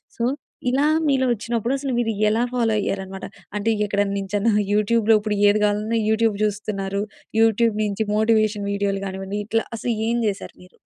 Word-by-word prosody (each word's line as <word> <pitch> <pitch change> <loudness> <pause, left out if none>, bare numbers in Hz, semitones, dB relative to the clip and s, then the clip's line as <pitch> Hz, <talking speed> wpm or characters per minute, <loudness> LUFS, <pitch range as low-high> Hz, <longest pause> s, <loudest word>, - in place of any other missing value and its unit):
So, 235 - -3 0.5
ఇలా 270 +3 +2 0.2
మీలో 270 -2 +2
వచ్చినప్పుడు 235 +2 -1
అసలు 275 -1 -3
మీరు 225 -2 0 0.2
ఎలా 225 +3 +1
ఫాలో 230 -3 +1
అయ్యారనమాట? 190 -1 -4 0.3
అంటే, 215 +2 +1
ఎక్కడనుంచన్నా 200 +1 0 0.2
యూట్యూబ్‌లో 220 +1 +3
ఇప్పుడు 210 -1 -2
ఏది 210 +1 +2
కావాలన్నా 210 +2 0
యూట్యూబ్ 220 -1 +2
చూస్తున్నారు. 200 -1 -2 0.4
యూట్యూబ్ 225 0 +3
నుంచి 210 +1 -1
మోటివేషన్ 215 -1 +2
వీడియోలు 200 -1 -1
కానివ్వండి, 195 +2 -4
ఇట్లా 225 0 +1
అసలు 235 +2 -1 0.2
ఏం 235 - +1
చేశారు 200 -1 -4
మీరు? 180 - -20
215 Hz, 150 wpm, -22 LUFS, 200-230 Hz, 0.5 s, యూట్యూబ్‌లో